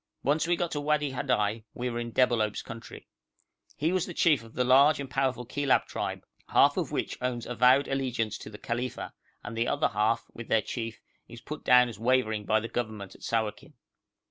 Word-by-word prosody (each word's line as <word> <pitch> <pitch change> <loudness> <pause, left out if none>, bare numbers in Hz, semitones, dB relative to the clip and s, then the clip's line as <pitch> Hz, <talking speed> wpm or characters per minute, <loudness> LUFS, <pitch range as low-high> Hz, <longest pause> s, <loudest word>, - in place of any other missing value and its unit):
Once 150 +4 +1
we 175 - +3
got 170 0 -1
into 145 - -2
Wadi 150 -1 +1
Hadai 115 -4 0
we 125 - -3
were 120 -1 -3
in 120 0 -4
Debalohp's 115 -4 +1
country. 115 0 -10 0.7
He 160 +3 +1
was 185 -2 -1
chief 150 -8 +3
of 115 - -15
the 125 - +2
large 140 +4 +5
and 140 - -4
powerful 130 -1 -1
Kilab 140 +2 +1
tribe, - - -4 0.2
half - - +5
of - - -2
which - - -3
owns 125 -2 -2
avowed 125 +3 +4
allegiance 125 -5 -2
to - - -9
the 105 - -10
Khalifa, 120 +3 -4 0.3
and - - -6
the 115 +1 0
other - - +1
half, 105 +3 +1
with 120 - -8
their 110 - +2
chief, 115 -2 -5 0.3
is - - -11
put - - -8
down 125 0 +6
as 115 -4 -8
wavering 115 -3 +1
by 110 +1 +3
the 115 - -5
Government 110 -5 -4
at - - -18
Sawakin. 110 -2 -2
120 Hz, 195 wpm, -28 LUFS, 115-135 Hz, 0.7 s, down